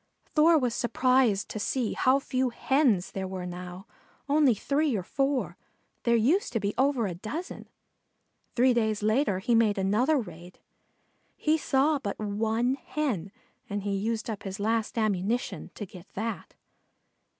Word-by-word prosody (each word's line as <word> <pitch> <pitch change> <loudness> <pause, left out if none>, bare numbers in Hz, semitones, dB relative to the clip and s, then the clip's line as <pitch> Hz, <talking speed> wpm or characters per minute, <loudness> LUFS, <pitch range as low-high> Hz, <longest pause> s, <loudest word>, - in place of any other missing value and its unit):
Thor 320 +1 +6
was 250 -5 0
surprised 240 -3 +2
to 215 - -5
see 235 +2 -1
how 260 +1 +3
few 260 -2 -1
Hens 245 -6 +1
there 190 -1 -4
were 185 -1 -5
now, 180 +1 -7 0.4
only 285 -4 +4
three 280 +4 0
or 190 - -2
four. 270 +5 -1 0.5
There 235 -1 +4
used 265 - +2
to 225 - +1
be 205 0 -1
over 265 -2 +2
a 185 - -2
dozen. 255 - -6 0.9
Three 255 +1 +4
days 220 -3 0
later 215 -1 +2
he 195 +6 0
made 225 -3 +3
another 215 +10 +2
raid. 180 -7 -7 0.8
He 310 0 +2
saw 295 0 +2
but 200 -6 -4
one 220 +4 0
Hen 225 - -2 0.4
and 205 -1 -3
he 200 0 -1
used 220 +2 -2
up 220 -4 -4
his 195 +1 -6
last 225 +2 -1
ammunition 215 +2 -1
to 210 - -5
get 180 -1 -14
that. 225 +3 -4
225 Hz, 150 wpm, -28 LUFS, 200-265 Hz, 0.9 s, Thor